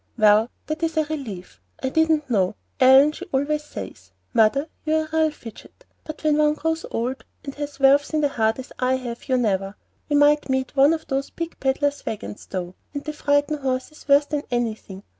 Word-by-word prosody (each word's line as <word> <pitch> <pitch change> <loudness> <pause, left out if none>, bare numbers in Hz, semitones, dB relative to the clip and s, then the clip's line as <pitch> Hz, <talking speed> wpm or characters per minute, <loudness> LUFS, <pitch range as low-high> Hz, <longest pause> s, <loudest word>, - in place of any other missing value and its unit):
"Well, 215 +1 +5 0.2
that 310 +1 -4
is 325 -1 -1
a 315 - +4
relief. 215 - -7 0.2
I 260 - +1
didn't 315 0 +2
know. 200 -5 +1 0.2
Ellen 265 +3 +7
she 345 +4 -9
always 295 +3 0
says, 95 - -9 0.2
'Mother, 250 +7 +3 0.2
you're 315 0 +1
a - - -15
real 320 -1 +3
fidget;' 235 -7 -13 0.2
but 310 0 -8
when 305 -1 +3
one 300 0 +3
grows 320 +1 -2
old, 250 +3 -3 0.2
and 275 - -6
has 290 0 -6
valves 275 +1 +4
in 310 -1 +1
the 290 - +2
heart 225 -4 +1
as 260 - -9
I 255 0 +2
have, 245 0 -6
you 260 - +3
never 195 -4 0 0.3
We 290 - +1
might 290 0 +4
meet 265 0 -1
one 280 +3 +5
of 320 -1 -4
those 270 0 -2
big 335 0 -6
pedler's 285 +2 0
wagons, 210 -1 -6
though, 180 -1 -4 0.2
and 285 - -3
they 305 - -4
frighten 290 0 +1
horses 265 +3 -4
worse 285 +1 +5
than 295 -1 -2
anything. 220 -5 -3
275 Hz, 195 wpm, -23 LUFS, 235-300 Hz, 0.3 s, Ellen